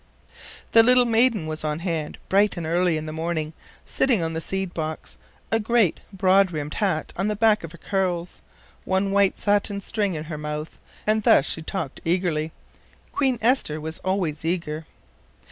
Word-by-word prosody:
The 230 - +8
little 250 +1 +5
maiden 230 -5 +3
was 155 0 -4
on 150 -1 -1
hand 165 -3 -3
bright 200 0 +3
and 170 - -3
early 170 0 +2
in 155 - -5
the 155 - -5
morning, 160 -1 -2 0.3
sitting 240 -10 +1
on 165 0 -2
the 160 - -3
seed 190 +1 -3
box, 155 -1 -5 0.4
a 225 - +3
great 225 -4 +2
broad 195 0 +4
brimmed 150 -3 -4
hat 190 -7 -1
on 195 +3 -1
the 210 - 0
back 215 -1 +3
of 165 - -7
her 170 - -12
curls, 180 -2 -2 0.4
one 190 +1 0
white 200 -1 +3
satin 205 0 +1
string 200 -2 -1
in 155 - -4
her 155 -1 -6
mouth, 150 +1 -5 0.3
and 215 +1 +2
thus 145 - +5
she 160 - -2
talked 160 -4 -5
eagerly. 165 -3 0 0.6
Queen 265 -3 +1
Esther 230 - +2
was 160 +1 -5
always 185 -6 -1
eager. 160 -2 -2
180 Hz, 175 wpm, -24 LUFS, 160-205 Hz, 0.6 s, The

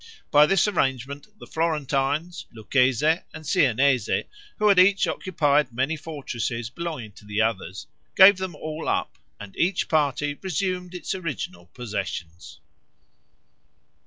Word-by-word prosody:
By 150 +1 +7
this 195 +3 +3
arrangement 140 - -1
the - - -11
Florentines, 155 +1 -1
Lucchese, 130 +7 +2 0.2
and 155 0 -9
Siennese, 135 - +2 0.5
who 210 - +2
had 200 -3 +6
each 195 +2 +5
occupied 150 -7 +1
many 130 +6 -1
fortresses 125 -7 -5
belonging 155 -9 -5
to 105 - -17
the 105 0 -3
others, 105 -3 -2 0.3
gave 195 0 +8
them 185 -3 -5
all 155 +1 -5
up, - - -2 0.2
and 100 -1 -10
each 185 +3 0
party 145 -1 0
resumed 185 0 -3
its 180 - -4
original 125 - -5
possessions. 90 -9 -6
145 Hz, 125 wpm, -24 LUFS, 120-170 Hz, 0.5 s, gave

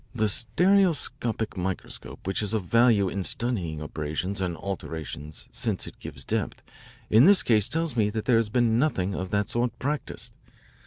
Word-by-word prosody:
The 110 -2 +2
stereoscopic 130 - +2
microscope, 95 0 -5
which 95 +3 -1
is 105 +1 -1
of 105 - -1
value 115 0 +4
in 95 +1 -2
studying 90 -10 -1
abrasions 80 +6 -3
and 90 -3 -2
alterations 80 -5 -6
since - - -2
it - - -11
gives - - -7
depth, - - -2 0.5
in 115 +5 +7
this 200 +1 +6
case 110 -4 +3
tells 165 -4 -1
me 105 -3 +2
that 110 0 -3
there 120 -3 +4
has 115 -2 +1
been 115 0 +2
nothing 100 -10 +1
of 95 -1 -3
that 105 +1 0
sort 120 0 -1
practised. 145 +3 -3
110 Hz, 165 wpm, -26 LUFS, 95-120 Hz, 0.5 s, in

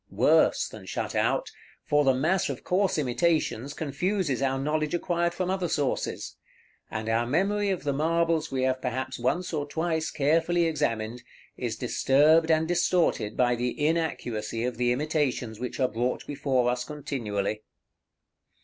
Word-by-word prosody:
Worse - - +3
than - - -11
shut - - -3
out, - - 0 0.3
for 150 0 +3
the 135 -2 +4
mass 165 +8 +1
of - - -5
coarse 190 0 +1
imitations 145 -1 0
confuses 160 - -1
our 135 -1 +1
knowledge 155 +3 -1
acquired 170 0 0
from 180 +1 -2
other 190 -2 -1
sources; 145 -5 -2 0.5
and 110 0 -4
our 115 +1 +1
memory 200 +8 +1
of 190 -2 -2
the 145 -1 0
marbles 165 +2 +1
we 130 -1 -1
have 130 0 0
perhaps 130 0 -3
once 170 +9 -1
or 145 -2 -2
twice 160 +1 -1
carefully 165 +4 +2
examined, 120 -7 -1 0.3
is - - -3
disturbed 155 +4 +3
and 160 0 +3
distorted 175 - +1
by 125 -1 +3
the 120 +3 -3
inaccuracy 135 -8 -1
of 125 -1 -2
the 120 0 +2
imitations 130 -5 -1
which 125 +2 -5
are 130 - +3
brought 120 +2 -2
before 135 -4 0
us 125 0 -2
continually. 110 -8 -3
145 Hz, 150 wpm, -27 LUFS, 125-165 Hz, 0.5 s, the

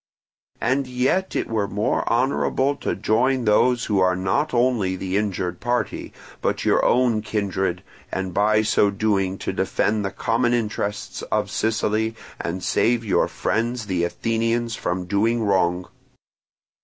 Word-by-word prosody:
And 130 +3 0
yet 130 +10 0
it - - -1
were 110 -3 -1
more 105 +2 -1
honourable 130 +3 +1
to - - -2
join 120 +5 +1
those 120 +3 +3
who 105 -3 +1
are 90 -1 +3
not 95 +12 0
only 120 -6 +1
the 95 0 -3
injured 95 -4 -1
party, 120 0 -2 0.3
but - - -1
your - - +3
own 120 -3 +3
kindred, 95 -4 -2 0.3
and 95 -1 -3
by 105 +2 +3
so 105 -1 +3
doing 100 -2 0
to - - -4
defend 105 0 0
the 100 - -1
common 120 +4 +1
interests 105 -3 -3
of - - 0
Sicily 110 0 0 0.2
and 90 +2 -4
save 115 +3 +1
your 100 - +2
friends 115 +1 -1
the 90 -4 -1
Athenians 115 +5 -1
from 90 -3 -3
doing 110 +5 +1
wrong. 90 -3 +1
110 Hz, 145 wpm, -23 LUFS, 95-120 Hz, 0.3 s, those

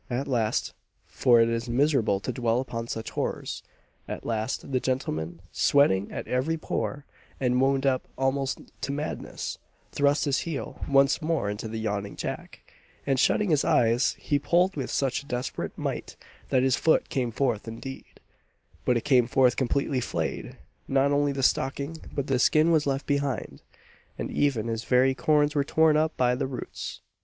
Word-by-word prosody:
At 130 +3 -2
last 115 -5 0 0.3
for 120 -2 +4
it 115 - +4
is 115 +1 -2
miserable 120 -6 +2
to - - -3
dwell 120 -2 0
upon 115 -3 -4
such 110 -1 -5
horrors - - -3 0.5
at - - -6
last, 110 +4 -2
the 130 - +2
gentleman, 85 -11 -2
sweating 100 -9 +3
at - - -5
every 135 +6 0
pore, 145 -2 -3 0.3
and 125 -1 +2
wound 135 0 +2
up 130 -2 +1
almost 135 +1 0 0.2
to - - -2
madness, 145 +2 -4 0.3
thrust 145 +1 +2
his 140 -2 +1
heel 160 -5 -5
once 140 +3 +4
more 155 -10 0
into 105 +2 -5
the 110 +1 -5
yawning 100 -2 -3
jack, - - -7 0.3
and 135 -2 +1
shutting 205 +7 +3
his 150 -2 +3
eyes, 115 +2 +3
he 145 -2 0
pulled 175 +6 +2
with 135 -4 -3
such 135 -1 0
a 140 - -17
desperate 125 -1 -4
might, - - -4 0.3
that 130 -1 +3
his 130 -1 +3
foot 160 - +2
came 125 -3 -1
forth 115 -2 -1
indeed 135 +4 -8 0.7
but 125 - +3
it 115 - -3
came 125 -3 +4
forth 125 0 +3
completely 135 +1 0
flayed. - - -3 0.3
Not 135 +1 +2
only 145 0 +2
the 135 -1 -3
stocking, 140 +5 0
but 140 - -2
the 135 -3 +1
skin 155 +5 +4
was 155 -3 +3
left 135 0 -1
behind 140 -4 -2 0.6
and - - -4
even 135 -7 +1
his 115 0 -2
very 130 +2 +3
corns 150 +1 +2
were 145 -2 +2
torn 160 +2 +3
up 155 +1 +1
by 125 -1 +3
the 125 - -1
roots! 130 -2 -6
135 Hz, 170 wpm, -27 LUFS, 120-145 Hz, 0.7 s, for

